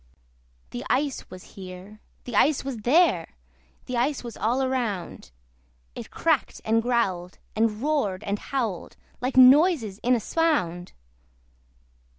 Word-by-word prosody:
The 120 - -5
ice 275 +1 -1
was 185 -1 -11
here, 190 +2 -10 0.2
the 245 - -6
ice 285 +6 +3
was 270 -3 -4
there, 245 - +2 0.5
The 255 - -3
ice 265 +3 0
was 235 -2 -7
all 240 +6 0
around: 240 -9 -3 0.6
It - - -8
cracked - - 0
and 225 +1 +2
growled, 195 -7 -1 0.2
and 220 +1 0
roared 280 -12 0
and 200 +1 -2
howled, 230 -10 -4 0.2
Like 255 +1 -2
noises 260 - +5
in 250 +1 +2
a - - 0
swound! 200 - -1
235 Hz, 130 wpm, -25 LUFS, 195-265 Hz, 0.6 s, noises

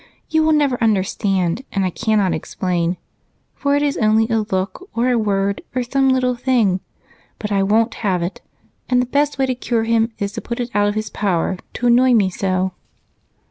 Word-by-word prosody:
You 315 - +3
will 315 0 +3
never 285 -5 +1
understand, 195 -1 0
and 195 -1 0
I 185 - -1
cannot 210 -3 +1
explain, 175 +2 -2 0.6
for 280 0 0
it 290 - +1
is 285 -1 0
only 220 0 +3
a 225 -1 +2
look, 195 - -3
or 245 +2 +2
a - - +2
word, 200 -2 0
or 255 - +1
some 270 +2 +1
little 255 -1 +2
thing 240 -7 +1 0.6
but 210 -1 -5
I 200 -1 +2
won't 220 +4 +2
have 185 -5 0
it, 175 - -5 0.5
and 250 -1 +3
the 250 - +2
best 285 +3 0
way 270 - +2
to 260 - 0
cure 240 -2 -1
him 230 0 +1
is 200 0 -2
to - - -6
put 235 +1 -5
it 240 0 -3
out 205 0 +2
of 205 - -1
his 215 -1 -3
power 185 -2 -1
to 245 - -4
annoy 245 +1 +5
me 195 -4 +3
so." 185 0 -1
220 Hz, 200 wpm, -19 LUFS, 195-250 Hz, 0.6 s, annoy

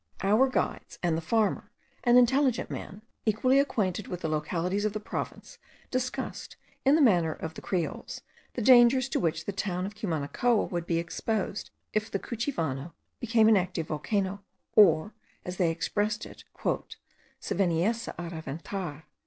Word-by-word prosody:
Our 215 +7 +4
guides 255 - -2
and 170 -2 +2
the 165 - -2
farmer, 215 +5 0 0.3
an 245 -1 +6
intelligent 255 0 +3
man, 205 +2 -7 0.2
equally 255 +5 +3
acquainted 210 -8 0
with 180 0 -5
the - - -1
localities 170 +6 -1
of 210 -1 0
the 215 - -2
province, 210 - -6 0.3
discussed, 255 0 -3 0.3
in 275 +2 +5
the 315 - +5
manner 175 - +4
of 160 +1 -6
the - - -9
Creoles, 175 -4 -3 0.3
the 240 - -2
dangers 250 +2 +6
to - - 0
which 160 -2 -1
the - - -2
town 185 -2 -2
of 205 - -5
Cumanacoa 210 +3 0
would 175 -1 -3
be 165 - +1
exposed 195 +4 -2 0.2
if 215 +1 0
the - - -1
Cuchivano 170 - -3 0.3
became 230 -2 +3
an 220 - +7
active 175 -3 -2
volcano, 195 +5 -1 0.3
or, 190 -1 +6 0.3
as 180 0 -5
they 175 -3 +3
expressed 205 +6 -1
it, - - -13 0.9
"se - - -3
veniesse 195 +5 +1
a 175 -1 -6
reventar." 160 +1 -5
200 Hz, 155 wpm, -28 LUFS, 170-230 Hz, 0.9 s, an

